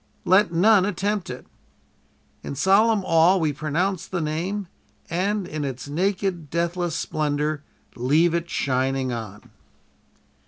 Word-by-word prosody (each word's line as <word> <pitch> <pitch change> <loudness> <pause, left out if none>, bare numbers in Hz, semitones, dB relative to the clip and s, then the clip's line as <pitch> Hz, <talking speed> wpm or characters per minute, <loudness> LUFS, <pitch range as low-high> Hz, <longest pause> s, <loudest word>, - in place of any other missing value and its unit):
Let 190 0 +4
none 190 +4 +5
attempt 200 0 -1
it. 125 0 -7 1.0
In - - -6
solemn 200 - +3
awe 165 +3 +5
we 155 -4 0
pronounce 160 +6 -1
the 185 - -3
name 170 +6 -2 0.4
and, 195 +3 0
in 155 -4 -4
its 135 -1 -5
naked, 180 0 -1
deathless 170 +1 -1
splendor, 150 -1 -1 0.3
leave 150 +8 +2
it 170 0 -2
shining 130 -2 0
on." 110 -3 -8
170 Hz, 120 wpm, -24 LUFS, 145-190 Hz, 1.0 s, none